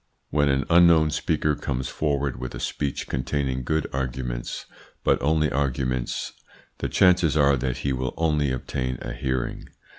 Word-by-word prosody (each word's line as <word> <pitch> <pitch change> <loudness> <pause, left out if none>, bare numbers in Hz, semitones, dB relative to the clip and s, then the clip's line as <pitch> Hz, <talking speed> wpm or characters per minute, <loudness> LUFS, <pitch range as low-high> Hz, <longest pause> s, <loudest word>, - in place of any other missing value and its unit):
When 75 -1 +3
an 70 0 +2
unknown 85 -2 +6
speaker 75 -1 +1
comes 65 -2 -3
forward 70 -3 -1
with 65 - -5
a - - -6
speech 70 -2 -3
containing 65 0 -1
good 80 +4 0
arguments, 60 -2 -3 0.4
but - - +2
only 75 +1 +2
arguments, 65 -3 -1 0.5
the - - -2
chances 90 -5 +4
are 70 -2 +5
that 65 0 -2
he 70 - +1
will 65 0 -3
only 75 -4 +1
obtain 65 0 -3
a - - -5
hearing. 65 0 -2
70 Hz, 150 wpm, -25 LUFS, 65-75 Hz, 0.5 s, unknown